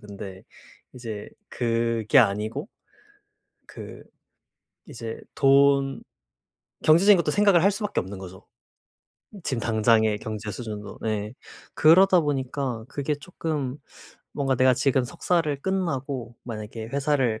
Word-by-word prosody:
근데 100 -2 -9 0.5
이제 110 -4 -7 0.2
그게 115 +1 +1
아니고 110 - +1 1.0
그 - - -10 0.9
이제 115 -1 -7
돈 140 0 +3 0.8
경제적인 185 +6 +6
것도 155 -3 0
생각을 200 -1 +4
할 200 - +6
수밖에 205 0 -2
없는 95 +1 -8
거죠. 95 0 -11 1.0
지금 130 -4 -2
당장의 110 -1 +2
경제 110 -1 -5
수준도 105 -1 -7
네. 110 +1 -3 0.4
그러다 180 +3 +6
보니까 135 -5 -2
그게 145 +1 -2
쪼끔 145 -4 -4 0.6
뭔가 135 -2 0
내가 130 +1 +5
지금 135 -1 +1
석사를 160 0 -1
끝나고 140 - -2
만약에 110 -1 -7
회사를 135 -5 0
130 Hz, 240 characters per minute, -25 LUFS, 110-150 Hz, 1.0 s, 경제적인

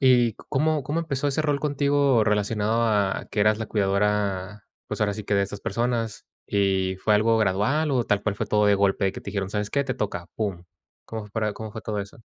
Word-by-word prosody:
¿Y 125 -4 +5
có - - -17
cómo 150 +1 +1 0.2
empezó 145 -4 -2
ese 150 +3 0
rol 145 -2 0
contigo 140 -5 +2
relacionado 105 +2 +1
a 105 -3 +1
que 105 - -1
eras 105 +1 +4
la 110 - -3
cuidadora, 100 -1 0 0.2
pues, - - -5
ahora 105 -1 +2
sí 105 - -6
que 105 - 0
de 100 - +3
esas 100 +1 -5
personas? 115 -2 -2 0.2
Y 95 -2 +1
fue 105 +3 +2
algo 110 +2 +3
gradual 110 +10 +1
o 125 -3 +1
tal 100 -1 +1
cual 105 - -1
fue 110 - -2
todo 105 0 +2
de 100 - +5
golpe, 95 -1 +2
que - - -8
te 100 - -7
dijeron: 95 -1 -3
"¿Sabes 105 0 -2
qué?, 140 -1 +1
te - - -2
toca", 90 -4 -3
pum. 100 -5 -3 0.4
¿Cómo 110 -2 -6
para 110 0 -1
cómo 110 0 -7
fue 110 - -6
todo 105 -1 -3
eso? 100 +3 -9
105 Hz, 220 wpm, -25 LUFS, 100-120 Hz, 0.4 s, Y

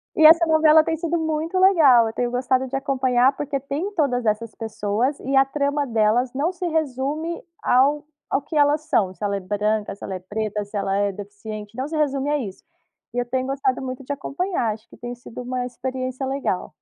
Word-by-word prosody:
E 315 - +7
essa 330 +2 +8
novela 315 0 +6
tem 325 - -1
sido 335 +1 -1
muito 320 +3 -1
legal, 305 - +6
eu 220 - -3
tenho 240 +1 -1
gostado 255 +1 +1
de 270 - -3
acompanhar 265 -1 +2
porque 285 -1 -3
tem 285 +9 -3
todas 250 - 0
essas 215 +1 -1
pessoas, 225 +4 -1
e 270 +2 -3
a 270 - +6
trama 285 +1 -1
delas 230 +2 +1
não 310 +7 0
se 360 0 -4
resume 310 +2 -2 0.2
ao 280 +4 +3 0.3
ao 270 - +2
que 300 +3 -7
elas 290 +1 +4
são, 200 - +2
se 190 - -18
ela 200 -1 0
é - - -4
branca, 205 +2 -1
se 200 - -20
ela 190 - -4
é - - -3
preta, 210 +2 -3
se 205 - -22
ela 195 -1 0
é 200 0 +1
deficiente, 210 +2 -8
não 260 +2 -2
se 320 - -6
resume 280 -1 0
a 295 - +2
isso. 200 -8 -7 0.5
E 245 - -4
eu 245 - 0
tenho 255 +1 -1
gostado 270 -1 -1
muito 255 0 -5
de 260 - -17
acompanhar, 285 - -1
acho 215 +1 -11
que - - -15
tem 245 0 -6
sido 245 0 -9
uma 250 0 -3
experiência 255 +1 -4
legal. 270 -8 -2
260 Hz, 215 wpm, -23 LUFS, 220-290 Hz, 0.5 s, essa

